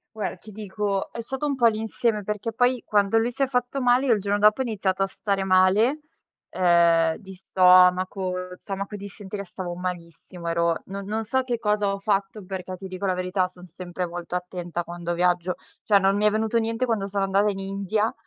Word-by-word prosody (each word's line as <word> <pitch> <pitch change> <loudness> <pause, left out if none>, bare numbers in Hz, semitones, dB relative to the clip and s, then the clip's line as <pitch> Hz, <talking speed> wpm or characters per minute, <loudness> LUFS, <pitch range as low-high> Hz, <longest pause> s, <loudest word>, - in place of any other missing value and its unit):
Guarda, 210 -3 -3
ti 215 - -14
dico 205 -1 -3
è 235 - -5
stato 265 +5 -4
un 285 -1 0
po' 240 -3 +4
l'insieme, 220 0 0
perché 210 +3 -3
poi 245 +2 +1
quando 205 +1 +2
lui 230 +2 +1
si 275 +3 -1
è - - +2
fatto 250 +1 -1
male, 250 +2 +3
io 240 - +5
il 215 - +1
giorno 200 +1 0
dopo 210 +3 +5
ho - - +2
iniziato 195 -5 -1
a - - 0
stare 195 0 -2
male, 195 +10 +4 0.5
uhm, 170 -2 +4
di 195 -3 -12
stomaco, 185 0 +4 0.3
stomaco 200 +1 -5
e - - -5
dissenteria, 200 0 -7
stavo 180 -1 -6
malissimo, 175 -1 -6
ero 170 0 +1
non 195 +1 -6
non 220 +2 -2
so 260 +5 0
che 245 -2 -2
cosa 210 -2 +1
ho 200 - -4
fatto 195 0 -1
perché, 185 -1 -5
ti 190 +1 -8
dico 185 +1 -5
la 185 - +2
verità, 185 +1 0
son 180 -1 -16
sempre 180 +1 -5
molto 175 0 -6
attenta 180 -1 -4
quando 175 0 -4
viaggio, 180 +1 +1 0.3
cioè 205 - +4
non 195 +1 +2
mi 210 - +1
è - - +7
venuto 220 +2 0
niente 230 +2 0
quando 220 -5 -1
sono 200 0 -1
andata 195 +2 +2
in 195 -1 -3
India, 195 +2 -1
195 Hz, 205 wpm, -25 LUFS, 185-220 Hz, 0.5 s, è